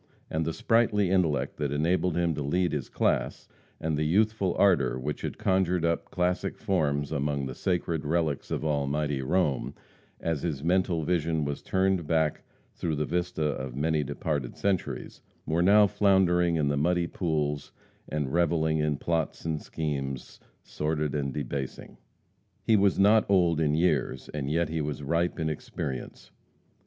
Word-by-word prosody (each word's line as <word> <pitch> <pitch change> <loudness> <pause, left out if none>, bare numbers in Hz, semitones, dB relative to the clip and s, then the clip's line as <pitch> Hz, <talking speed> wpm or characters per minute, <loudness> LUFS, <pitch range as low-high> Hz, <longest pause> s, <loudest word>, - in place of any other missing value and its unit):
And 80 0 0
the 80 - 0
sprightly 105 -1 +2
intellect 85 -6 +1
that 75 - -1
had 75 +1 -2
enabled 90 +2 +1
him 85 -1 +1
to 75 - -4
lead 90 +4 +1
his 75 -4 -3
class, - - 0 0.3
and 80 -1 -1
the 75 - 0
youthful 100 +2 +2
ardor 70 -11 +3
which 70 +4 -4
had - - -4
conjured 90 -2 +1
up 85 0 -1
classic 90 0 -1
forms 75 -6 0
among 70 -2 -1
"the 65 - -5
sacred 85 +1 -1
relics 80 -2 -1
of - - -2
Almighty 70 -1 0
Rome," 75 -2 0 0.4
as 80 -4 -2
his 75 -5 -3
mental 90 -1 +1
vision 80 -2 0
was 70 0 -3
turned 95 -3 +1
back 80 -1 +1 0.3
through 80 -3 -2
the 75 +1 -1
vista 90 -1 -2
of 65 -4 -2
many 75 +1 +1
departed 70 -1 -3
centuries, 100 -3 -2 0.2
were 80 +3 +1
now 105 +3 +6
floundering 90 -4 +3
in 75 -3 +1
the 70 0 +1
muddy 85 +4 +2
pools, 75 -5 -2 0.4
and 75 -3 -2
reveling 80 -2 +2
in 75 -1 0
plots 80 0 -2
and 80 -2 -2
schemes, 70 -4 -4 0.2
sordid 75 -1 -2
and 70 -2 -1
debasing. 70 -1 -5 0.7
He 110 - +4
was 100 -2 +3
not 105 +2 +4
old 85 -5 +3
in 75 -2 +2
years, 85 +3 0
and 70 -2 -4
yet 85 +2 +1
he 80 -1 -1
was 75 0 -4
ripe 85 +5 0
in 80 - 0
experience. 70 -3 -5
80 Hz, 160 wpm, -28 LUFS, 75-90 Hz, 0.7 s, now